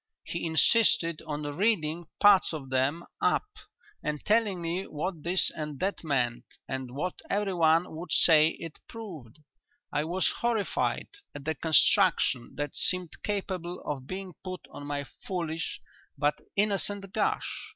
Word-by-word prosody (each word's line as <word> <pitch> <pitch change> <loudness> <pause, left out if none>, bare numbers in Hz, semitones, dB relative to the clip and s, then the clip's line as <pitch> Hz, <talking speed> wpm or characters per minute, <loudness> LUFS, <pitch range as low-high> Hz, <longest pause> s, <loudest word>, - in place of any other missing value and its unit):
He 170 0 -3
insisted 165 -1 +4
on 150 -1 -3
reading 165 0 0
parts 205 -4 +6
of 135 -4 -6
them 135 +6 +1 0.2
up - - +2 0.6
and 150 0 -2
telling 210 -3 +2
me 170 +3 -2
what 160 +2 -4
this 175 +4 +2
and 150 -3 -5
that 195 -1 -1
meant 125 -6 0 0.2
and 130 -1 -4
what 180 +5 -3
everyone 175 -5 +2
would 170 +3 -7
say 155 -1 +6
it 165 -2 -8
proved. 165 - -9 0.6
I 150 +1 +1
was 180 +3 +1
horrified 230 -4 0 0.3
at 145 -1 -8
the 160 - +1
construction 160 - +3
that 145 -1 -3
seemed 185 -3 -1
capable 185 -4 -3
of 135 -3 -5
being 185 +1 -6
put 185 -1 -5
on 145 - -8
my 145 -1 -2 0.2
foolish 165 -3 -3 0.4
but 145 +1 +2 0.2
innocent 200 -1 0
gush. - - -1
165 Hz, 140 wpm, -29 LUFS, 150-190 Hz, 0.6 s, parts